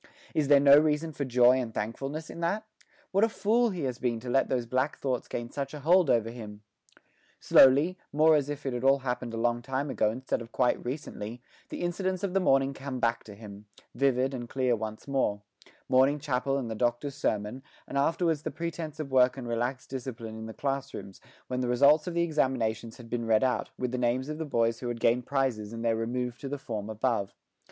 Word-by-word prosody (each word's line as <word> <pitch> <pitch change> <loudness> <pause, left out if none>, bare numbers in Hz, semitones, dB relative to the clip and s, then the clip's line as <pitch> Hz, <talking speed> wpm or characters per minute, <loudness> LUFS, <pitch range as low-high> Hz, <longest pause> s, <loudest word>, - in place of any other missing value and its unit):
Is 150 -2 +1
there 145 0 +7
no 140 +1 +8
reason 155 +1 0
for 140 -1 -4
joy 125 0 +5
and 120 -3 -3
thankfulness 135 +9 -4
in - - -9
that? 200 +6 -1 0.5
What 195 +2 +3
a 225 - +4
fool 225 +4 +2
he 180 -6 -4
has 130 -2 -3
been 120 -2 -1
to 125 0 -5
let 135 +1 +2
those 125 -2 0
black 130 +5 -1
thoughts 130 -3 -2
gain 120 0 -5
such 140 +1 -4
a 150 - -8
hold 175 +1 +4
over 115 -1 +2
him! 105 -3 -9 0.8
Slowly, 145 +8 +5
more 155 +2 +5
as 145 -1 0
if 145 -1 -5
it 135 - -1
had 120 0 -3
all 135 +1 +5
happened 125 -1 -2
a 115 - -5
long 120 +1 0
time 135 +3 -2
ago 105 - +2
instead 125 +2 -3
of 115 0 -10
quite 125 -1 +1
recently, 120 -3 -6 0.3
the - - -6
incidents 185 +2 -2
of 190 -2 -1
the 195 - +3
morning 135 -6 +3
come 135 -1 -5
back 115 -1 0
to 105 - -10
him, 105 -1 -11 0.3
vivid 135 -1 +1
and 120 -2 -6
clear 130 -2 +1
once 110 +1 -6
more 115 -7 0 0.4
morning 135 +3 +4
chapel 135 -1 -1
and 130 -4 -3
the - - -1
Doctor's 120 +5 -1
sermon, 110 -2 -2 0.3
and - - -7
afterwards 160 +2 +1
the - - -3
pretence 165 -2 -5
of 145 -3 -5
work 130 0 +4
and 125 -3 -6
relaxed 120 +3 -3
discipline 120 -4 -6
in 110 0 -7
the - - -6
class 140 0 -3
rooms, 95 - -9 0.3
when 125 - -2
the 125 - -1
results 140 +6 +5
of 175 - -3
the 170 - +2
examinations 125 -8 -1
had 120 - -12
been 115 0 -3
read 110 +1 +4
out, 130 -1 0
with 125 -1 -2
the 125 - -2
names 125 +3 0
of 155 +1 -5
the 160 - -2
boys 115 -5 +1
who 125 - -5
had 120 -1 -3
gained 120 +2 +2
prizes 130 -6 -1
and 115 0 -5
their 115 -1 +2
remove 120 +2 -3
to 135 - -6
the 145 - -3
form 110 -5 -5
above. 110 -2 -1
130 Hz, 225 wpm, -29 LUFS, 115-145 Hz, 0.8 s, no